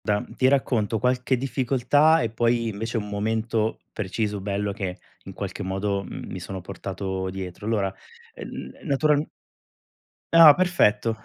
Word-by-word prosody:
Da 105 +2 0
ti 130 - +3
racconto 120 -5 +1
qualche 125 +2 +1
difficoltà, 135 +5 +3
e 115 - -2
poi 115 0 +1
invece 115 +3 -3
un 105 -2 -3
momento 110 +2 -1
preciso, 105 0 -2
bello, 100 +1 -2
che 95 -3 -4 0.3
in - - -8
qualche - - -5
modo, 100 +1 -2
mhmm, - - -8
mi 95 - -5
sono 95 +1 -6
portato 95 0 -4
dietro. 95 +1 -7
Allora, 100 -4 0 0.5
n - - -7 0.2
naturalm 145 +1 +2 1.1
Ah, 165 -3 +10
perfetto. 115 -11 +2
110 Hz, 140 wpm, -24 LUFS, 100-125 Hz, 1.1 s, Ah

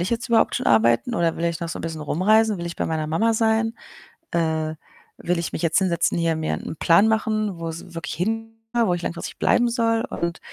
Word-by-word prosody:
ich 175 - -1
jetzt 235 +2 -2
überhaupt 230 -1 +3
schon - - -3
arbeiten, 115 - +3
oder 170 -3 +1
will 170 - -2
ich 170 -1 -2
noch 170 - -3
so 165 - -5
'n - - -7
bisschen 160 -1 -5
rumreisen? 210 +7 +2
Will 170 - -4
ich 170 - -6
bei - - -1
meiner 160 -1 -2
Mama 220 +9 +2
sein? 225 +1 +1 0.6
Äh, 160 -2 0 0.4
will 175 0 -1
ich 170 - -4
mich - - -3
jetzt 165 -1 +2
hinsetzen, 180 -3 +1
hier 165 -1 +1
mir 155 0 -1
'n - - -6
Plan 170 +8 +5
machen, 215 -4 0
wo's 165 +1 -6
wirklich 165 -2 -5
hin 225 +6 -2 0.3
wo 180 - +1
ich 175 - -3
langfristig 170 - -5
bleiben 240 0 +3
soll? 230 -1 +1
Und 170 0 -3
170 Hz, 220 wpm, -23 LUFS, 165-220 Hz, 0.6 s, Plan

